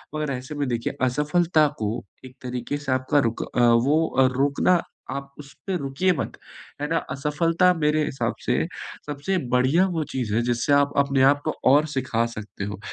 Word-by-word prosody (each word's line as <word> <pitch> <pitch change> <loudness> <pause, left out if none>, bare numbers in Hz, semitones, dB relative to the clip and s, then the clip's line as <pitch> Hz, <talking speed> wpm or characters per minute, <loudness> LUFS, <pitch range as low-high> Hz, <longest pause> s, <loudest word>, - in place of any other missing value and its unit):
मगर 150 -2 -2
ऐसे 130 +3 -6
में 145 -1 -1
देखिए 120 -2 -2
असफलता 150 +4 +2
को 110 +2 -2 0.2
एक 130 0 -12
तरीक़े 125 +3 -3
से 145 -2 -4
आपका 130 +3 +2
रुक 115 - -5
अ, - - +1
वो 120 +7 +4
अ, 135 - +7
रोकना 145 +6 +3 0.3
आप 140 +1 -5
उसपे 150 +7 -6
रुकिए 140 +5 0
मत, 140 - -3 0.5
है 145 - -1
ना, 165 - +1
असफलता 165 +6 +2
मेरे 155 -2 +1
हिसाब 135 - -2
से - - +1 0.4
सबसे 150 +6 -2
बढ़िया 130 +9 +3
वो 160 -2 -1
चीज़ 120 -6 -2
है 115 - +2
जिससे 120 +3 +1
आप 140 0 +4
अपने 140 -1 +2
आप 145 0 +2
को 155 - +1 0.2
और 145 +3 +5
सिखा 125 -3 0
सकते 105 -2 -7
हो, 105 -1 -6
140 Hz, 180 wpm, -24 LUFS, 125-155 Hz, 0.5 s, अ